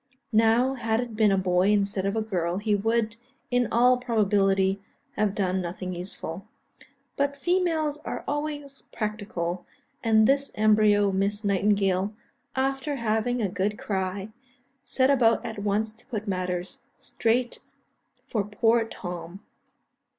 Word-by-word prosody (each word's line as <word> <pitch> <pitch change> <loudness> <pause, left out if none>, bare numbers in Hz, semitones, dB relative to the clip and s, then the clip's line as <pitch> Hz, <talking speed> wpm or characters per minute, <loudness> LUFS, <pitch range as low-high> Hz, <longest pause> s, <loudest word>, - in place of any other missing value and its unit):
Now, 225 +4 +4
had 225 -3 0
it 240 -3 -4
been 215 -2 +4
a 195 - +3
boy 185 0 +2
instead 200 -2 +1
of 200 - -1
a 220 - 0
girl, 180 -4 -1
he 210 +1 0
would, 225 +2 0 0.3
in 245 -1 +2
all 250 +2 +5
probability, 200 -5 +2 0.3
have 205 -1 0
done 190 -1 0
nothing 180 +1 -5
useful. 175 0 -6 0.7
But 280 0 0
females 325 -3 0
are - - -5
always 290 -1 -4
practical; 205 -5 -3 0.4
and 220 -2 +5
this 275 +3 +2
embryo 210 -1 +4
Miss 200 +2 0
Nightingale, 200 0 +1 0.4
after 270 +2 -1
having 230 0 0
a - - +2
good 200 +3 -1
cry, 195 +1 -3 0.5
set 260 0 +2
about 240 -3 +3
at 220 -2 -5
once 210 +2 0
to 225 - -18
put 215 -5 -4
matters 185 -1 -3 0.2
straight 235 +2 0 0.7
for 215 -4 0
poor 225 +3 +2
Tom. 180 -2 -7
215 Hz, 135 wpm, -26 LUFS, 195-240 Hz, 0.7 s, all